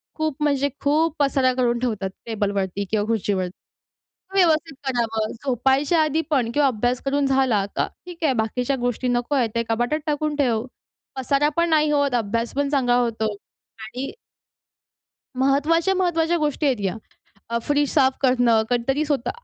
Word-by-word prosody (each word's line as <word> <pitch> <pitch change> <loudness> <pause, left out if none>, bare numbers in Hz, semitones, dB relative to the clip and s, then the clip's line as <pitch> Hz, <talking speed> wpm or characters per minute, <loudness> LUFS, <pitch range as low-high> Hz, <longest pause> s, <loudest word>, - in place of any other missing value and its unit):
खूप 310 -2 -1
म्हणजे 285 -1 +1
खूप 305 +2 +2
पसारा 270 -2 +2
करून 240 -2 +1
ठेवतात 215 -6 -2 0.2
टेबलवरती 200 -3 -2
किंवा 210 -1 +1
खुर्चीवरती. 200 -5 -1 0.8
ते - - +1
व्यवस्थित 315 -3 +1
करावं, 225 -4 -1
झोपायच्या 270 +5 +2
आधी 310 +1 +1
पण 250 -6 +1
किंवा 290 -1 +4
अभ्यास 245 +1 -1
करून 280 +1 +1
झाला 265 -7 +2
का. - - +1 0.2
ठीक 345 -2 -7
आहे, 280 - +4
बाकीच्या 250 +5 -1
गोष्टी 245 +1 -1
नको 245 +3 0
आहेत 250 -5 +2
ते 230 - +1
कपाटात 240 +7 0
टाकून 300 0 -1
ठेव, 240 -6 +1 0.5
पसारा 275 +3 +1
पण 340 0 +2
नाही 305 -1 +3
होत, 285 -3 +1
अभ्यास 230 0 -1
पण 280 0 0
चांगला 250 -4 +2
होतो. 225 -3 0 0.5
आणि 250 +5 -5 1.3
महत्त्वाच्या, 300 +7 +2
महत्त्वाच्या 345 -2 +1
गोष्टी 300 -1 -1
आहेत 265 -4 +2
या. 190 - -1 0.5
अ, 235 - 0
फ्रीज 290 -1 +1
साफ 265 -3 +4
करणं. 245 -4 +3
कधीतरी 250 +4 +1
स्वतः 285 -4 -1
265 Hz, 155 wpm, -23 LUFS, 235-295 Hz, 1.3 s, किंवा